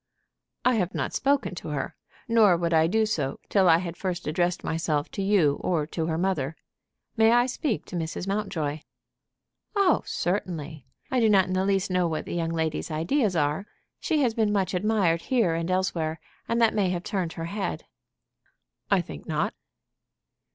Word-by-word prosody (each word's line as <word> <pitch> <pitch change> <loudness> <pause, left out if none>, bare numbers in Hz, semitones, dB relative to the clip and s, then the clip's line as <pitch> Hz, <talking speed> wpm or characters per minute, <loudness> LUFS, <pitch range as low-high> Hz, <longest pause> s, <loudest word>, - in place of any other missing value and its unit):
"I 250 - +5
have 185 -2 -1
not - - -2
spoken 275 -6 +1
to 175 - -7
her. 150 -2 -3 0.3
Nor 215 -6 +5
would 170 0 -1
I 160 0 +5
do 220 +5 +2
so 150 -11 -2
till 190 -3 +4
I 165 - +7
had 170 -1 -4
first 180 -2 -3
addressed 175 +3 0
myself 155 -2 -1
to - - -4
you 195 -8 +3
or 165 -5 0
to 160 +1 -3
her 160 -1 -1
mother. 165 -5 -1 0.6
May 225 -1 +5
I 240 0 +5
speak 255 -2 -2
to - - -8
Mrs. 165 +1 -3
Mountjoy?" 165 -7 -2 1.0
"Oh, 395 -5 +4
certainly. 160 -7 -3 0.2
I 260 - +2
do 225 -2 +4
not 195 -3 +5
in 185 - -3
the 185 +1 +1
least 195 -1 +1
know 180 -1 +2
what 160 -2 -3
the - - -5
young 165 -1 -1
lady's 160 -1 -2
ideas 180 - 0
are. 150 +6 0 0.3
She 310 -4 +1
has 240 -3 +2
been 220 -2 +1
much 195 -2 0
admired 185 -4 +2
here 230 -10 +3
and 165 +1 -2
elsewhere, 170 -4 -1 0.3
and 235 - +1
that 230 -2 +4
may 200 -3 +1
have 180 -1 -2
turned 180 -5 -2
her 165 - -5
head." 200 +3 -4 1.0
"I 195 -3 +4
think 175 - -10
not." 155 -2 -1
180 Hz, 180 wpm, -26 LUFS, 165-210 Hz, 1.0 s, I